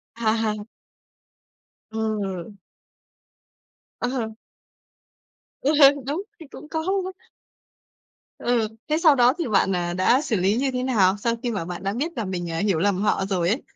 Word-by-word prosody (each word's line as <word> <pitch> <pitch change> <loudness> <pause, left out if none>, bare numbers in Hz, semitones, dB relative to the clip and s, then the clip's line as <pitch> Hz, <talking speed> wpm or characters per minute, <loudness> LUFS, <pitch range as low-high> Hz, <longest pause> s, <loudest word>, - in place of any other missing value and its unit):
À 225 -2 +1
hà. 215 -1 +1 1.4
Ừ. 210 -4 -3 1.5
Ờ. 245 -3 -2 1.3
Ừ 285 - +2
hừ, 280 - +10 0.2
đúng, 310 +7 -1 0.2
thì 320 - -11
cũng 300 - -10
có 320 -1 -2
luôn. 380 -1 0 1.3
Ừ, 235 -3 +1 0.2
thế 305 - +2
sau 315 -4 +5
đó 245 +1 +5
thì 330 - -1
bạn, 195 -3 +2
à, 175 0 -1
đã 235 +9 +3
xử 235 -7 -1
lý 195 +4 +2
như 270 0 0
thế 250 0 -2
nào? 200 -7 +3
Sau 230 +2 0
khi 240 - -1
mà 195 -6 -3
bạn 180 +1 -6
đã 195 +1 -1
biết 300 +8 -2
là 225 -4 -2
mình, 175 -2 -4
à, 165 - -3
hiểu 195 -6 +1
lầm 200 0 +1
họ 195 -2 +1
rồi 180 -3 0
ấy. 240 +7 0
220 Hz, 165 wpm, -24 LUFS, 190-260 Hz, 1.5 s, hừ